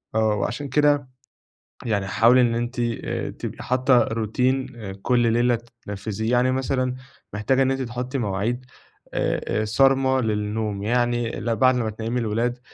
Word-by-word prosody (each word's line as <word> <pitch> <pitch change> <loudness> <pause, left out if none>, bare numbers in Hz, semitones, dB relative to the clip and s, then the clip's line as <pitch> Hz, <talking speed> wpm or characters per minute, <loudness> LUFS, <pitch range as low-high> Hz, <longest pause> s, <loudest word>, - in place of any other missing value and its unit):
آه، 110 -1 +2
وعلشان 140 +7 -3
كده 145 0 +3 0.8
يعني 100 -4 0
حاولي 115 +6 +5
إن 120 -2 +2
أنتِ 120 +2 -3
آآ، 120 -1 -2
تبقي - - -7
حاطة 125 -1 +3
روتين 125 +5 0 0.3
كل 120 -1 +2
ليلة 120 0 +2 0.3
تنفذيه، 105 +2 -3
يعني 125 +1 +3
مثلًا 130 -1 -1 0.4
محتاجة 110 +6 +1
إن 135 0 +3
أنتِ 135 0 -1
تحطي 125 +2 -4
مواعيد 115 +3 -2 0.5
آآ - - 0 0.2
آآ، - - -1
صارمة 130 +3 +3
للنوم. 105 -2 -2
يعني 120 +1 +1
ل 115 +1 -2
بعد 130 +3 +4
ما 115 -3 0
تنيِّمي 115 +3 -3
الولاد، 120 +2 -1
120 Hz, 145 wpm, -23 LUFS, 110-130 Hz, 0.8 s, حاولي